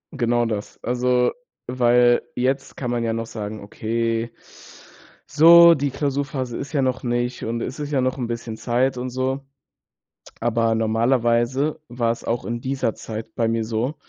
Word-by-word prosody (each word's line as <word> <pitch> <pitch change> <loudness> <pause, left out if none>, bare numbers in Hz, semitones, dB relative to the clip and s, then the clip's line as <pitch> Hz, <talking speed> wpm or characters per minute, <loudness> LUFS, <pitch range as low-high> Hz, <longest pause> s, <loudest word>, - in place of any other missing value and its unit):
Genau 120 -2 +1
das. 105 -2 -4
Also, 125 0 +1 0.3
weil 120 -1 +3
jetzt 135 +2 -1
kann 125 -3 -3
man 120 -1 -1
ja 115 - 0
noch 115 0 -3
sagen: 110 -1 -6
„Okay, 115 +2 -2 0.9
so, 170 +3 +8
die 145 -1 -1
Klausurphase 135 -3 -2
ist 140 - -6
ja 140 - +2
noch 130 -1 -1
nicht 120 +1 -2
und 115 +1 -3
es 130 - -5
ist 145 0 -4
ja 140 - +1
noch 130 +1 0
'n 120 - -2
bisschen 115 -1 -5
Zeit 125 +3 0
und 125 +1 -3
so,“ 130 +2 -2 1.0
aber 115 -1 +1
normalerweise 120 +6 +1
war 120 -1 0
es - - -8
auch 115 0 -2
in 120 0 -3
dieser 130 -3 -1
Zeit 110 0 -7
bei 115 -1 0
mir 115 0 0
so, 115 +6 -2
120 Hz, 165 wpm, -22 LUFS, 115-130 Hz, 1.0 s, so